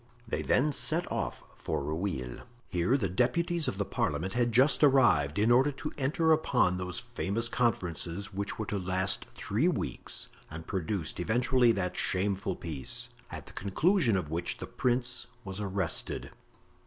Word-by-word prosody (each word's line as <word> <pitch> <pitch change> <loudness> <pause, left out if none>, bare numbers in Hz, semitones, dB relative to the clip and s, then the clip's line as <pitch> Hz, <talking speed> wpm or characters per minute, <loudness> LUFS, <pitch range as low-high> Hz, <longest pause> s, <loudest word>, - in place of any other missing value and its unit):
They - - -2
then 150 +4 +2
set 165 +4 0
off - - -3
for 75 -3 -3
Rueil. 75 -5 -3 0.3
Here 90 +10 +2
the 105 -8 0
deputies 160 - +1
of 95 - -2
the 100 - 0
parliament 80 +5 -1
had 120 -1 +1
just 130 +7 +4
arrived, 85 - +4
in 110 +3 +3
order 130 +4 +5
to 150 +3 -5
enter 155 +4 +1
upon 90 - +3
those 90 -1 -3
famous 115 -2 -1
conferences 100 -4 -1
which 100 +1 -3
were 110 - -3
to 100 0 -2
last 95 +1 0
three 115 - 0
weeks, 180 - -2 0.2
and 80 0 -8
produced 95 -2 -2
eventually 120 +5 +3
that 90 -3 -2
shameful 95 +1 0
peace, 75 -6 -4 0.2
at - - -7
the - - -12
conclusion 125 - +2
of 80 -5 -4
which 85 +2 -2
the - - -6
prince 120 0 0 0.2
was 95 +1 -4
arrested. 95 -4 -1
100 Hz, 155 wpm, -30 LUFS, 90-125 Hz, 0.3 s, order